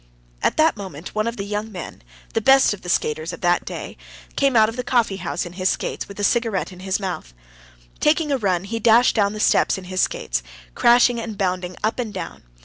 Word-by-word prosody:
At - - +1
that 315 +1 +4
moment 190 -6 -8
one 215 +1 0
of 235 +1 -3
the 200 - -3
young 210 +2 -4
men, 180 -5 -8 0.3
the 225 - +1
best 270 0 +5
of 205 - -9
the 180 - -7
skaters 155 0 -1
of 170 - -9
the 175 -1 +3
day, - - -7 0.4
came 275 -2 +2
out 220 -1 +6
of 225 - -5
the 250 - -3
coffee 235 -6 +1
house 180 -1 -3
in 175 - -9
his 185 +1 0
skates, - - -3
with 200 0 -11
a - - -2
cigarette 225 -4 +1
in 180 - -12
his 190 +1 -1
mouth. 180 - -5 0.6
Taking 300 0 +2
a 275 - +1
run, 185 -5 0
he 225 +3 -4
dashed 230 +2 +5
down 205 -2 +2
the 215 - -6
steps - - +3
in 190 - -8
his 185 0 -2
skates, - - -1 0.3
crashing 240 - +4
and 220 -3 -6
bounding 180 -1 -2
up 220 +3 0
and 235 -4 -2
down. - - -7
205 Hz, 230 wpm, -22 LUFS, 185-230 Hz, 0.6 s, out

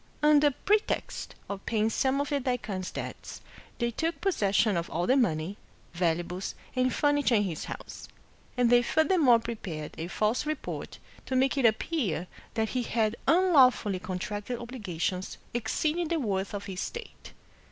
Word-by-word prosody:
Under 300 -1 +6
pretext 415 +10 -1
of 200 -1 -5
paying 220 -1 +1
some 265 +3 +1
of 285 - -1
the 285 - +1
daikwan's 225 -8 -2
debts, - - -7 0.4
they 235 -1 0
took 325 +8 -2
possession 210 - +2
of 170 0 -2
all 175 +2 -1
the 255 - +4
money, 190 - +1 0.4
valuables, 175 +1 -1 0.2
and 255 0 +2
furniture 290 -2 +2
in 205 - +4
his 170 -6 -3
house; - - -8 0.5
and 245 -1 +3
they 240 0 +7
furthermore 310 -2 +4
prepared 185 -10 -5
a 165 - -3
false 215 +9 0
report 310 -1 -4 0.3
to 260 - -1
make 265 +2 +3
it 270 -4 +5
appear 220 - 0 0.3
that 220 -1 0
he 255 - -1
had 225 -2 0
unlawfully 265 - +5
contracted 205 +6 -4
obligations 190 -7 -4 0.2
exceeding 310 +8 0
the 330 0 0
worth 200 -5 -1
of 200 0 -5
his 190 -3 -5
estate. 470 - -7
235 Hz, 150 wpm, -29 LUFS, 195-280 Hz, 0.5 s, they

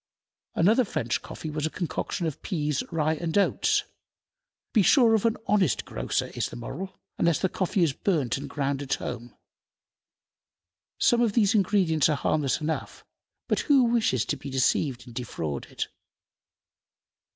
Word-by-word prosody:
Another 220 +9 +4
French 120 - -2
coffee 155 - -7
was 150 0 -1
a - - -4
concoction 175 +1 -3
of 155 -4 -4
peas, 150 -7 -1
rye, 160 -1 +1
and 160 +3 -2
oats. 200 - +2 0.9
Be 220 - +5
sure 230 - +5
of 220 +1 +3
an 225 - 0
honest 185 - +2
grocer, - - -2
is - - -2
the - - -9
moral, 180 +11 -7 0.2
unless 170 -2 +3
the 190 - +1
coffee 185 0 0
is 155 -5 +2
burnt 150 - 0
and 140 0 -6
ground 140 -1 -1
at 140 - -1
home. 120 -1 -7 1.6
Some 240 0 +3
of 230 -4 +2
these 210 -2 +3
ingredients 185 -7 +3
are 150 - +1
harmless 145 -3 0
enough, 155 +1 -4 0.4
but - - +1
who 275 -3 +4
wishes 230 - +2
to 145 - -2
be 140 +1 -8
deceived 130 -1 +1
and 120 - -12
defrauded? 80 - -4
160 Hz, 150 wpm, -27 LUFS, 140-200 Hz, 1.6 s, Be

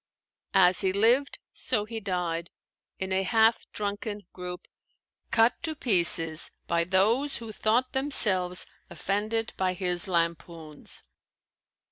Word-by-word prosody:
As 185 -1 +5
he 190 - +1
lived, 235 +8 +2 0.2
so 210 -4 0
he 225 +1 -6
died, 175 -4 -3 0.5
in 190 0 -5
a 190 - +1
half 225 +3 +3
drunken 205 0 -5
group, 180 0 -7 0.6
cut 230 +1 +2
to 320 -2 -3
pieces 170 - +5 0.2
by 170 0 0
those 220 +10 +1
who 225 -2 -8
thought 230 +4 0
themselves 195 -10 0 0.2
offended 215 +3 -3
by 185 -1 0
his 180 +1 0
lampoons. 165 -3 -4
195 Hz, 115 wpm, -27 LUFS, 180-225 Hz, 0.6 s, As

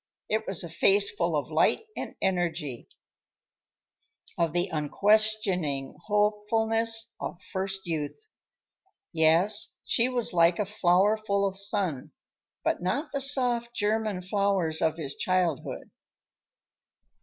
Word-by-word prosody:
It 220 +1 -1
was 190 -3 -1
a - - -6
face 200 +5 +2
full 170 -5 -1
of 145 0 -3
light 155 - +2
and - - -6
energy, 170 -8 -2 1.5
of 170 -2 0
the 175 +3 -1
unquestioning 180 -3 +2
hopefulness 225 +2 +2
of 175 - -6
first 190 0 -2
youth. 165 - -5 0.9
Yes, 170 +6 +3
she 240 +1 +2
was 245 -5 0
like 170 0 +4
a 210 - -1
flower 195 +1 +2
full 200 -2 -1
of 195 -1 -2
sun, 195 - -2 0.5
but - - -1
not 275 - -2
the 280 - -2
soft 245 -4 +2
German 210 -3 -1
flowers 190 -4 0
of 160 0 +1
his 145 -4 -5
childhood. 180 -6 -2
195 Hz, 120 wpm, -27 LUFS, 170-215 Hz, 1.5 s, like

